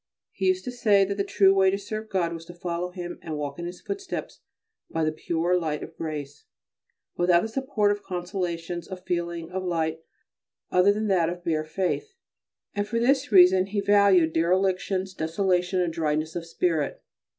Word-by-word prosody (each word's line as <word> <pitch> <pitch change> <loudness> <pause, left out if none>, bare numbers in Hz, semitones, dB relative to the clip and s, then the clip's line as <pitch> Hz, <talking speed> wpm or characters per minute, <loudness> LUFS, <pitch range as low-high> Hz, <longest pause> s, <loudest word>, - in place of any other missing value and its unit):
He 190 - -2
used 185 0 +2
to 250 - -3
say 210 -5 +4
that 200 - -2
the 200 - +1
true 195 -1 +4
way 190 -1 +4
to 195 - 0
serve 215 +2 -6
God 175 -4 0
was 165 -1 -7
to 175 - -11
follow 175 0 -3
Him 175 -1 -7
and 155 -2 -5
walk 145 +1 -4
in 170 - -4
His 175 +1 -8
footsteps 395 -1 -5 0.5
by 165 - -1
the 155 - +1
pure 170 +3 0
light 155 -3 -2
of 165 - -10
grace, 150 -3 -6 0.7
without 175 0 +4
the - - -1
support 225 -3 0
of 205 0 -2
consolations, 175 -2 -4
of 185 -1 -8
feeling, 170 -1 -3
of 190 0 -3
light, 160 -3 -1 0.7
other 180 +2 +5
than 215 +1 -1
that 175 -4 +3
of 175 0 -6
bare 155 -2 0
faith, 190 - -2 0.6
and 205 0 -2
for 230 +2 -2
this 265 +3 +2
reason 185 -1 +6
he 205 +1 -2
valued 200 -5 +4
derelictions, 185 +2 +1
desolation, 180 +2 0
and 175 -2 0
dryness 155 -1 -1
of 170 -1 -4
spirit. 165 -3 -1
180 Hz, 185 wpm, -26 LUFS, 165-200 Hz, 0.7 s, reason